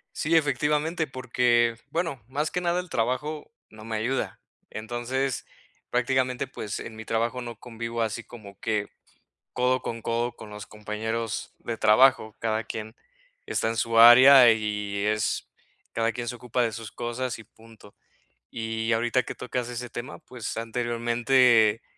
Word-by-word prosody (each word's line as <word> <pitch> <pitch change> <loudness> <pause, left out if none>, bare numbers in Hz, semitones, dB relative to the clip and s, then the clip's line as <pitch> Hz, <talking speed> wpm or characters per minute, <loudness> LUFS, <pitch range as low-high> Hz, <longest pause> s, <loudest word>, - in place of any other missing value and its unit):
Sí, 165 +1 +1
efectivamente, 150 +3 +1
porque, 120 -2 +2
bueno, 165 -8 -2
más 150 +4 -2
que 180 - -1
nada 175 0 +1
el 180 - -5
trabajo, 130 - -2 0.2
no 110 0 -13
me 110 0 -4
ayuda. 125 +5 -2 0.3
Entonces, 120 +4 -3 0.5
prácticamente, 125 +1 0
pues, 110 -5 -6
en 110 - -8
mi 110 - -8
trabajo 115 +3 -1
no 120 -1 -8
convivo 115 -1 -4
así 110 +1 -3
como 100 -5 -13
que 105 -2 -1 0.7
codo 125 +1 +1
con 115 -1 -5
codo 120 +1 -1
con 105 - -11
los 105 0 -8
compañeros 110 +2 -4
de 115 -1 -5
trabajo, 110 0 +4
cada 110 0 -1
quien, 110 +1 -6 0.5
está - - 0
en 115 - -3
su 115 -1 0
área 125 +1 +10
y 105 -2 -2
es 110 -1 -1 0.4
cada 115 0 0
quien 120 +1 -5
se 120 - -3
ocupa 125 +1 -2
de 115 -2 +1
sus 110 -1 -7
cosas 120 0 -4
y - - -10
punto. 110 -2 -18 0.5
Y, 115 0 -3
ahorita 120 +2 +2
que - - -7
tocas 125 -1 -4
ese 120 0 -5
tema, 125 +5 -6
pues, 125 -8 -7
anteriormente, 120 0 +3
120 Hz, 155 wpm, -26 LUFS, 110-130 Hz, 0.7 s, área